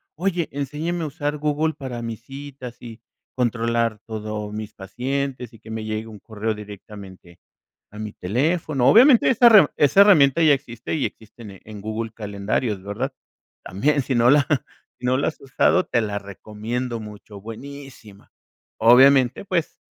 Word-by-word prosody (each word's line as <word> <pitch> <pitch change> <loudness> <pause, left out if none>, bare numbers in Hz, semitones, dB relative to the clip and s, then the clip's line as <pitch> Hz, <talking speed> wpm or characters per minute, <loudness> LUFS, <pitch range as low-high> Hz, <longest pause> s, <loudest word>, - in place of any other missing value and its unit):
"Oye, 175 -1 -1
enséñeme 150 +5 -3
a - - -2
usar 145 0 -3
Google 150 +1 -1
para 130 -5 -6
mis 115 -1 -6
citas, 135 -2 -10
y 115 -1 -10 0.4
controlar 115 -2 0
todo 105 -1 -5
mis 105 0 -6
pacientes, 125 +4 -4
y 115 - -15
que 110 - -15
me 110 0 -5
llegue 110 +1 -4
un 110 -2 -10
correo 110 +1 -4
directamente 100 -4 -12 0.5
a 105 - -12
mi 105 -1 -5
teléfono". 135 - 0
Obviamente, 250 - +6
esa 240 -1 +6
re 210 -9 +8
esa 150 +7 +6
herramienta 165 -7 +5
ya 155 -2 +6
existe, 125 -4 -4
y 150 - 0
existen 110 -3 -12
en 105 -1 -10
Google 110 +2 -4
calendarios, 105 0 -3
¿verdad? 100 +1 -4 0.5
También, 140 +10 0
si 130 - -2
no 120 0 +4
la 145 +2 +5 0.5
si 125 - -5
no 130 +1 +2
la 135 - 0
has 160 - -7
usado, 140 +7 +2
te 120 - +1
la 105 -1 -3
recomiendo 110 +4 -5
mucho, 105 -1 -11
buenísima. 115 -2 -11 0.5
Obviamente, 130 - +5
pues 175 -5 -2
120 Hz, 155 wpm, -22 LUFS, 110-145 Hz, 0.5 s, re